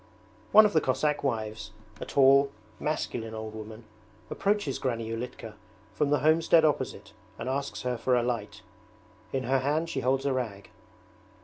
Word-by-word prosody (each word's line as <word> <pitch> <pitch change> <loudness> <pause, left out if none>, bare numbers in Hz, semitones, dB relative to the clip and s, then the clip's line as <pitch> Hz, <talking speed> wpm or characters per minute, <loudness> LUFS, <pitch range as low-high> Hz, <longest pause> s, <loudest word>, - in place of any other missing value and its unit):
One 215 +1 +9
of 205 - +1
the 155 - +4
Cossack 150 +3 0
wives, 110 -4 -3 0.3
a - - -5
tall, 140 +1 +5 0.3
masculine 115 -7 -3
old 110 0 -6
woman, 110 +1 -9 0.5
approaches 200 -9 0
Granny 115 -3 -2
Ulitka 115 -1 -6 0.4
from 150 -2 0
the 145 - +2
homestead 160 +1 +4
opposite 150 - -2 0.2
and - - -6
asks 140 +2 -3
her 125 -2 -2
for 125 +1 +2
a 120 - +2
light. 120 -4 -4 0.7
In 135 -1 -1
her 135 +2 +2
hand 150 +5 0
she - - -2
holds 135 +1 0
a 140 - +1
rag. 105 -6 -4
130 Hz, 155 wpm, -28 LUFS, 115-145 Hz, 0.7 s, One